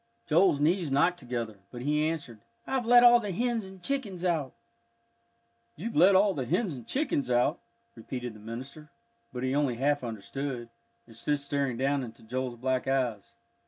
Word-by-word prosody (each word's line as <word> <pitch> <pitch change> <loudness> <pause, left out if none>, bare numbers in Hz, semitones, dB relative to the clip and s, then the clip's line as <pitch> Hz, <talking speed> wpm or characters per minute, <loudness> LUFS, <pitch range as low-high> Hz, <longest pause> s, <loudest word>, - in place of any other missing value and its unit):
Joel's 165 -2 +4
knees 165 +2 +2
knocked 170 +6 +2
together, 120 -5 -4
but 120 -1 -8
he 150 +2 +1
answered, 145 -9 -6 0.3
"I've 260 -3 -1
let 245 0 +8
all 240 0 +8
the 210 -4 -4
hens 235 +2 -1
and 190 -1 -12
chickens 205 -10 -2
out." 160 -7 0 1.2
"You've 225 +9 -5
let 185 +5 +6
all 195 +1 +5
the 130 -7 -3
hens 185 - 0
and 120 -3 -11
chickens 260 - -1
out?" 125 +6 +2 0.3
repeated 120 +1 -6
the 105 - -13
minister, 130 +8 -8 0.4
but 125 0 -5
he 130 0 0
only 140 -4 +1
half 145 +3 +1
understood, 120 +3 -5 0.4
and 115 - -16
stood 145 +5 -1
staring 140 -3 -2
down 135 +2 +1
into 115 -3 -9
Joel's 125 +1 -3
black 130 +1 -1
eyes. 125 -6 -1
140 Hz, 170 wpm, -29 LUFS, 125-180 Hz, 1.2 s, let